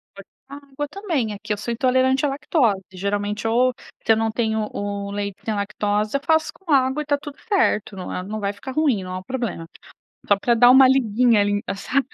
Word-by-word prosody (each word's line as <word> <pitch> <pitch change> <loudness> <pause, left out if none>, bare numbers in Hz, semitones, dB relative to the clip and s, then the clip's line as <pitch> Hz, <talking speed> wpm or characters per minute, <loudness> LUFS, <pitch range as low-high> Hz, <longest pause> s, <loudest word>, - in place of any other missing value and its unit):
Pode 200 0 -12 0.2
botar 280 0 -11
água 285 +2 -5
também, 320 - -2
aqui 205 +1 -4
eu - - -4
sou 215 +4 -4
intolerante 260 +2 +2
à - - +1
lactose, 255 - 0
geralmente 205 +3 -2
ou 250 +2 +3 0.3
se - - +4
eu 220 - +5
não 225 0 0
tenho 220 -2 -1
o 200 0 -4
leite 200 -1 -4
sem 220 - -2
lactose, 205 +2 -1
eu - - -9
faço 320 -1 +2
com 370 -4 -8
água 265 +1 +3
e - - -3
está 290 -1 0
tudo 285 0 -10
certo, 370 - +1
não 185 - -6
é 180 - -3
não 215 +3 -5
vai 200 -1 -1
ficar 260 +6 -8
ruim, 270 -9 +1
não 185 0 -6
há 185 - -3
um 185 - -13
problema, 235 -9 -4 0.6
só 205 - +4
pra 235 +4 +2
dar 245 +1 +6
uma 260 0 +8
liguinha, 240 -3 +3
ali, 205 0 +1
sabe 260 +7 -1
225 Hz, 225 wpm, -22 LUFS, 205-270 Hz, 0.6 s, uma